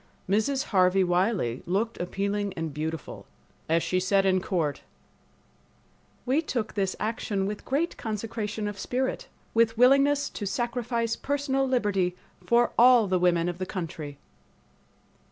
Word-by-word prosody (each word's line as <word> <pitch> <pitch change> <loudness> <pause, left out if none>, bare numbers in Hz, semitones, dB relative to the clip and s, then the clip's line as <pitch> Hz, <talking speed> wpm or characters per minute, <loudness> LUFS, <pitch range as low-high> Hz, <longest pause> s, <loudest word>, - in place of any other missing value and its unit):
Mrs. 220 +8 +1
Harvey 185 0 +4
Wiley 175 - 0
looked 215 +6 -1
appealing 200 +2 -2
and 160 -2 -4
beautiful 160 +2 -5 0.4
as 165 +1 +2
she 185 - 0
said 195 +1 +2
in 185 -1 +3
court, 165 -7 -1 1.4
"We 265 +5 +2
took 240 -8 -3
this 195 -2 -1
action 215 -3 -2
with 205 +1 -5
great 305 +6 -1
consecration 220 -1 -4
of 205 -1 -6
spirit, 260 +5 -2 0.3
with 230 0 +3
willingness 275 +3 +4
to 205 - -5
sacrifice 235 +1 -1
personal 275 -1 -1
liberty 205 -8 +1 0.3
for 240 0 +3
al] 245 -2 +7
the 185 -2 +1
women 175 -1 +2
of 175 0 -4
the 185 - -3
country." 160 -6 -6
205 Hz, 135 wpm, -27 LUFS, 185-240 Hz, 1.4 s, al